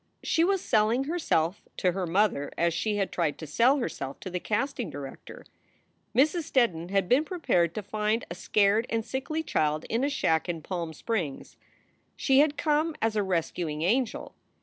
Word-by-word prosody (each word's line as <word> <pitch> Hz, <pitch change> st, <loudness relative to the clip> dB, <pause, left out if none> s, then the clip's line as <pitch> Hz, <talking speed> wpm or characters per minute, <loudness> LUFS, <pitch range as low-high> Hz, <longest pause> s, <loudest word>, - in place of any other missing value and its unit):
She 330 Hz, -, +2 dB
was 385 Hz, +1 st, +2 dB
"selling" 220 Hz, +5 st, +2 dB
herself 275 Hz, -, 0 dB, 0.2 s
to 185 Hz, -, +2 dB
her 185 Hz, 0 st, -3 dB
mother 175 Hz, -5 st, +1 dB
as 170 Hz, 0 st, +2 dB
she 210 Hz, +5 st, -1 dB
had 195 Hz, -2 st, -1 dB
tried 165 Hz, -4 st, -1 dB
to 160 Hz, -, -7 dB
sell 240 Hz, -, +3 dB
herself 140 Hz, -, -4 dB
to 185 Hz, -, -6 dB
the 180 Hz, -, -2 dB
casting 235 Hz, -, -2 dB
director. 140 Hz, -2 st, -9 dB, 0.7 s
Mrs. 310 Hz, +6 st, +3 dB
Steddon 180 Hz, -10 st, +2 dB
had 195 Hz, -1 st, +1 dB
been 260 Hz, +8 st, +4 dB
prepared 180 Hz, -, 0 dB
to 215 Hz, -, -3 dB
find 215 Hz, +3 st, -1 dB
a -, -, -6 dB
scared 205 Hz, +5 st, +2 dB
and 225 Hz, -1 st, -1 dB
sickly 270 Hz, +6 st, -3 dB
child 155 Hz, -, 0 dB
in 230 Hz, +3 st, +1 dB
a 285 Hz, -, +2 dB
shack 165 Hz, -, +1 dB
in 165 Hz, -3 st, -3 dB
Palm 170 Hz, -3 st, -4 dB
Springs. 170 Hz, -, -3 dB, 0.6 s
She 270 Hz, -1 st, +3 dB
had 295 Hz, 0 st, +3 dB
come 310 Hz, +1 st, +1 dB
as 225 Hz, -1 st, 0 dB
a 210 Hz, -, +2 dB
rescuing 170 Hz, -4 st, -2 dB
angel. 230 Hz, +6 st, 0 dB
210 Hz, 175 wpm, -28 LUFS, 170-265 Hz, 0.7 s, been